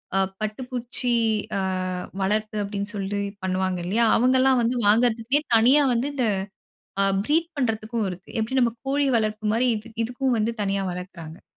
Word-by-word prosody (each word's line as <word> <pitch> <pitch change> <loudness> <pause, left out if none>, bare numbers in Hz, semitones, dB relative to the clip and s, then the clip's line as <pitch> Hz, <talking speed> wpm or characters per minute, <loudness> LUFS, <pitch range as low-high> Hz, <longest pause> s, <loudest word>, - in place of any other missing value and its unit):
ஆ - - +3 0.2
பட்டுப்பூச்சி 245 +2 -3 0.5
ஆ - - 0 0.6
வளர்ப்பு 215 +2 0
அப்டின்னு 200 +1 -4
சொல்லி 200 +1 -2 0.2
பண்ணுவாங்க 185 -1 -1
இல்லையா? 225 +5 +2
அவங்கள்ளாம் 255 +1 +4
வந்து 235 +2 0
வாங்குறதுக்குனே 235 +5 +3
தனியா 260 +6 +5
வந்து, 240 +4 0
இந்த 250 -4 +1 0.7
ஆ - - +4 0.2
ப்ரீட் 325 +3 +1
பண்றதுக்கும் 225 -3 -1
இருக்கு. 180 +1 -9
எப்டி 260 +4 0
நம்ம 235 -2 +2
கோழி 280 +1 +1
வளர்ப்பு 215 0 -2
மாரி, 245 +2 +2
இதுக் 225 +1 -12
இதுக்கும் 250 +1 -1
வந்து 225 +2 0
தனியா 195 0 0
வளக்குறாங்க. 175 -3 -8
225 Hz, 145 wpm, -24 LUFS, 200-250 Hz, 0.7 s, தனியா